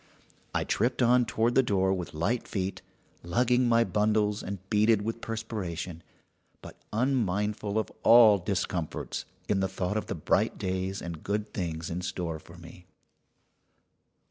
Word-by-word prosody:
I -, -, +2 dB
tripped 120 Hz, +3 st, +1 dB
on 125 Hz, +1 st, +5 dB
toward 115 Hz, +1 st, +1 dB
the 135 Hz, -, +6 dB
door 95 Hz, -5 st, +1 dB
with 90 Hz, -4 st, -5 dB
light 105 Hz, +10 st, -1 dB
feet, 95 Hz, -1 st, -3 dB, 0.4 s
lugging 120 Hz, +7 st, +2 dB
my 115 Hz, 0 st, +5 dB
bundles, 105 Hz, +1 st, +1 dB
and 100 Hz, +1 st, -5 dB
beaded 105 Hz, 0 st, +3 dB
with 115 Hz, +1 st, -4 dB
perspiration, 95 Hz, -7 st, -4 dB, 0.6 s
but -, -, -11 dB, 0.2 s
unmindful 105 Hz, -4 st, 0 dB
of 110 Hz, -, -1 dB
all 110 Hz, -4 st, +7 dB
discomforts 90 Hz, -3 st, -3 dB, 0.2 s
in 100 Hz, -, +1 dB
the 95 Hz, -, +1 dB
thought 95 Hz, +2 st, -2 dB
of 110 Hz, -, -3 dB
the -, -, -3 dB
bright 80 Hz, -, +1 dB
days 95 Hz, +1 st, -2 dB
and 85 Hz, -2 st, -6 dB
good 105 Hz, +1 st, -3 dB
things 85 Hz, -3 st, -3 dB
in 85 Hz, +2 st, -3 dB
store 85 Hz, -3 st, -3 dB
for 85 Hz, +3 st, -15 dB
me. 90 Hz, +1 st, -13 dB
100 Hz, 145 wpm, -28 LUFS, 90-115 Hz, 0.6 s, all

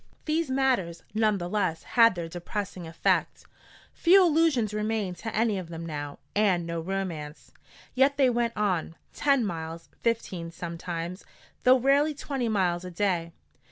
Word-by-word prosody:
] -, -, -37 dB
These 315 Hz, -1 st, 0 dB
matters 255 Hz, -11 st, 0 dB
none 215 Hz, -1 st, +2 dB
the 175 Hz, -2 st, -4 dB
less 180 Hz, -4 st, -1 dB
had 230 Hz, -4 st, +5 dB
their 170 Hz, -2 st, -4 dB
depressing 180 Hz, +1 st, -5 dB
effect. 165 Hz, 0 st, 0 dB, 0.5 s
Few 370 Hz, +3 st, +6 dB
illusions 305 Hz, -, +2 dB
remained 210 Hz, -4 st, -2 dB
to 225 Hz, -1 st, -5 dB
any 215 Hz, -2 st, +1 dB
of 175 Hz, -3 st, -8 dB
them 165 Hz, 0 st, -6 dB
now, 145 Hz, -3 st, -5 dB, 0.2 s
and 195 Hz, -5 st, +2 dB
no 170 Hz, 0 st, -3 dB
romance. 170 Hz, -5 st, -5 dB, 0.4 s
Yet 270 Hz, +2 st, +3 dB
they 265 Hz, -3 st, +4 dB
went 235 Hz, -1 st, 0 dB
on 185 Hz, -6 st, 0 dB, 0.2 s
ten 275 Hz, -5 st, +2 dB
miles, 165 Hz, -2 st, -5 dB
fifteen 195 Hz, -7 st, -1 dB
sometimes, 170 Hz, +1 st, -5 dB, 0.4 s
though 255 Hz, +1 st, +7 dB
rarely 280 Hz, +4 st, +3 dB
twenty 270 Hz, -4 st, -2 dB
miles 180 Hz, -4 st, +1 dB
a 180 Hz, -, -6 dB
day. 175 Hz, -2 st, -1 dB
195 Hz, 155 wpm, -27 LUFS, 170-240 Hz, 0.5 s, though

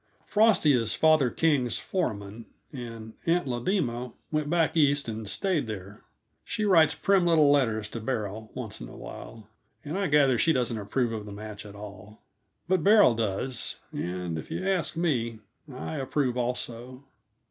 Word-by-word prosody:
Frosty 210 Hz, -8 st, +4 dB
is 115 Hz, -3 st, +1 dB
father 155 Hz, -5 st, +4 dB
King's 135 Hz, -6 st, +1 dB
foreman, 110 Hz, -, -3 dB, 0.3 s
and 115 Hz, -4 st, -8 dB
Aunt 175 Hz, +2 st, +2 dB
Lodema 125 Hz, -, -2 dB, 0.2 s
went 155 Hz, -1 st, -1 dB
back 165 Hz, -1 st, +2 dB
East 145 Hz, -3 st, +3 dB
and 110 Hz, -2 st, -5 dB
stayed 160 Hz, -, 0 dB
there. 100 Hz, -1 st, -7 dB, 0.4 s
She 215 Hz, -2 st, -2 dB
writes 160 Hz, -6 st, +5 dB
prim 195 Hz, +3 st, +3 dB
little 155 Hz, -4 st, +5 dB
letters 115 Hz, -7 st, +2 dB
to 115 Hz, -, -5 dB
Beryl, 110 Hz, -2 st, -4 dB
once -, -, -6 dB
in -, -, -7 dB
awhile, 110 Hz, -3 st, -10 dB, 0.4 s
and 160 Hz, +7 st, -3 dB
I 195 Hz, -, +1 dB
gather 145 Hz, -3 st, +4 dB
that -, -, +1 dB
she 165 Hz, -, +4 dB
doesn't 120 Hz, -3 st, 0 dB
approve 115 Hz, +3 st, -1 dB
of 105 Hz, -1 st, -5 dB
the -, -, -8 dB
match 105 Hz, +1 st, -8 dB
at 100 Hz, -, -11 dB
all. 105 Hz, 0 st, -11 dB, 0.4 s
But 185 Hz, -3 st, +2 dB
Beryl 205 Hz, -, +6 dB
does, 115 Hz, +3 st, -2 dB, 0.2 s
and, 90 Hz, -2 st, -3 dB
if -, -, -9 dB
you 185 Hz, -, -3 dB
ask 180 Hz, -3 st, 0 dB
me, 120 Hz, -10 st, 0 dB, 0.3 s
I 80 Hz, +1 st, -5 dB
approve 135 Hz, -1 st, -1 dB
also. 125 Hz, +1 st, -3 dB
125 Hz, 160 wpm, -27 LUFS, 110-155 Hz, 0.4 s, Beryl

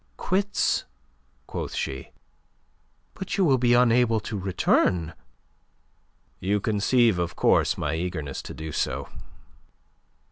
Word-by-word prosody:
"Quits?" 200 Hz, +2 st, 0 dB, 0.6 s
quoth -, -, -5 dB
she. 65 Hz, -, -4 dB, 1.0 s
"But 190 Hz, -, -5 dB
you 195 Hz, -, +3 dB
will 135 Hz, -5 st, +3 dB
be 120 Hz, 0 st, +4 dB
unable 120 Hz, -2 st, +4 dB
to 110 Hz, -, -5 dB
return!" 90 Hz, -3 st, +1 dB, 1.3 s
"You 100 Hz, +3 st, 0 dB
conceive, 110 Hz, 0 st, +2 dB
of 85 Hz, -1 st, -2 dB
course, -, -, +3 dB
my 75 Hz, 0 st, -2 dB
eagerness 80 Hz, -4 st, -3 dB
to -, -, -9 dB
do 80 Hz, 0 st, -6 dB
so. -, -, -2 dB
105 Hz, 110 wpm, -25 LUFS, 85-125 Hz, 1.3 s, be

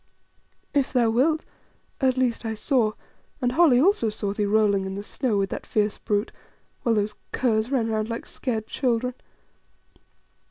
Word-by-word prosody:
"If 280 Hz, -3 st, +1 dB
thou 235 Hz, -3 st, +3 dB
wilt, 305 Hz, +7 st, +2 dB, 0.6 s
at 260 Hz, -1 st, +2 dB
least 250 Hz, -3 st, +1 dB
I 220 Hz, -1 st, -3 dB
saw, 225 Hz, -2 st, +1 dB, 0.5 s
and 245 Hz, -1 st, +1 dB
Holly 280 Hz, -3 st, +5 dB
also 330 Hz, -, +3 dB
saw 205 Hz, -1 st, -3 dB
thee 205 Hz, 0 st, -1 dB
rolling 200 Hz, -2 st, +2 dB
in 190 Hz, -, -5 dB
the 200 Hz, -, -5 dB
snow 230 Hz, 0 st, -1 dB
with 195 Hz, -1 st, 0 dB
that -, -, -4 dB
fierce 210 Hz, -1 st, 0 dB
brute, 205 Hz, +2 st, -1 dB, 0.5 s
while 230 Hz, -2 st, +2 dB
those 210 Hz, 0 st, 0 dB, 0.2 s
curs 225 Hz, -2 st, +1 dB
ran 255 Hz, -5 st, +1 dB
round 220 Hz, 0 st, -1 dB
like 230 Hz, -, -4 dB
scared 225 Hz, -4 st, -3 dB
children." 250 Hz, +1 st, 0 dB
225 Hz, 160 wpm, -25 LUFS, 210-255 Hz, 0.6 s, Holly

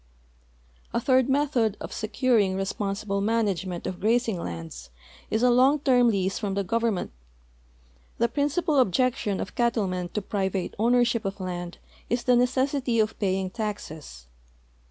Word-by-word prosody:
A -, -, +3 dB
third 260 Hz, +1 st, +3 dB
method 265 Hz, -7 st, +1 dB
of -, -, -7 dB
securing 215 Hz, -3 st, +1 dB
responsible 195 Hz, +1 st, -2 dB
management 195 Hz, -5 st, -1 dB
of 180 Hz, -, -4 dB
graz 235 Hz, +4 st, +2 dB
ing 200 Hz, -6 st, -2 dB
lands 80 Hz, -, -7 dB, 0.4 s
is 220 Hz, +2 st, 0 dB
a 250 Hz, -, +5 dB
long 260 Hz, +4 st, +5 dB
term 250 Hz, -3 st, +4 dB
lease 195 Hz, -3 st, 0 dB
from 200 Hz, -3 st, -2 dB
the 200 Hz, -, 0 dB
government. 230 Hz, -, -1 dB, 1.1 s
The 235 Hz, -, +2 dB
prin 285 Hz, +5 st, 0 dB
cipal 305 Hz, -2 st, +2 dB
objection 240 Hz, -1 st, +1 dB
of 185 Hz, -, -5 dB
cattlemen 195 Hz, -7 st, 0 dB
to 210 Hz, -, 0 dB
private 190 Hz, -2 st, -2 dB
ownership 235 Hz, 0 st, +3 dB
of 195 Hz, +1 st, -4 dB
land 175 Hz, -1 st, -5 dB, 0.3 s
is 240 Hz, +1 st, 0 dB
the 250 Hz, -, +4 dB
necessity 255 Hz, 0 st, +1 dB
of 215 Hz, 0 st, 0 dB
i)aying 190 Hz, -2 st, -1 dB
taxes. 160 Hz, -, -6 dB
220 Hz, 145 wpm, -26 LUFS, 190-245 Hz, 1.1 s, a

